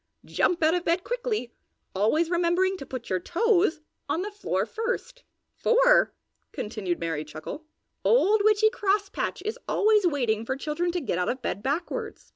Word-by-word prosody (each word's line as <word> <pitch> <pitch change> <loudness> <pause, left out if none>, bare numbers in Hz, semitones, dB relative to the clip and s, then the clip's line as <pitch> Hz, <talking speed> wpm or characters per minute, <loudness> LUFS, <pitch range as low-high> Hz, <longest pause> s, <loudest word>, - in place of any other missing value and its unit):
Jump 345 -2 +1
out 315 +1 +4
of 355 -1 0
bed 345 +2 +1
quickly, 475 - -3 0.4
always 300 - +1
remembering 355 +2 +2
to 275 -8 -9
put 255 -3 -6
your 185 - +1
toes 350 - +2 0.3
on 345 - 0
the 415 - -5
floor 410 0 -1
first. 485 +2 -4 0.3
"For," - - +4 0.4
continued 210 -5 -3
Merry 165 -3 -2
Chuckle, 155 - -8 0.4
"Old 435 -3 +4
Witchy 430 +1 +4
Crosspatch 405 -4 -1
is 430 - -3
always 425 -3 +4
waiting 240 -8 0
for 260 +3 -2
children 310 +5 -2
to 355 - -1
get 180 - -2
out 180 - 0
of 255 +1 -3
bed 200 - -2
backwards. 345 - -3
350 Hz, 160 wpm, -26 LUFS, 255-425 Hz, 0.4 s, out